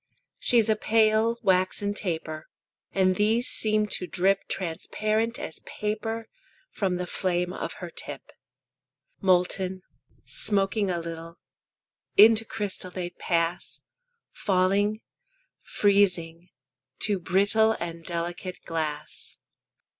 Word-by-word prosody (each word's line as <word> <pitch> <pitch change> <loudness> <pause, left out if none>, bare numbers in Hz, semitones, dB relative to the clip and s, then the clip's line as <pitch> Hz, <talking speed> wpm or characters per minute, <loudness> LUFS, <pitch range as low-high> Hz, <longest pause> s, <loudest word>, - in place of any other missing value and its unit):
She's 230 -3 +3
a 220 - +4
pale, 220 +1 +3
waxen 190 +1 +2
taper; 160 -6 -4 0.4
And 185 -1 +2
these 225 +4 +2
seem 215 -1 +1
to 180 - -1
drip 190 +2 +1
Transparent 215 +6 -1
as 295 - -5
paper 220 +1 -4 0.4
From 190 -3 0
the 180 0 -2
flame 180 -1 -1
of - - -4
her 175 -2 -8
tip. 145 -4 -7 0.9
Molten, 185 0 +1 0.4
smoking 200 0 +1
a 175 - 0
little, 165 0 -6 0.8
Into 225 +2 +8
crystal 205 -4 -3
they 180 -1 -5
pass; 170 -1 -1 0.5
Falling, 200 +3 +1 0.6
freezing, 180 -4 +1 0.5
to 205 -3 +2
brittle 205 +5 +3
And 170 -1 -5
delicate 175 +2 -4
glass. 155 -2 -4
190 Hz, 100 wpm, -27 LUFS, 175-215 Hz, 0.9 s, Into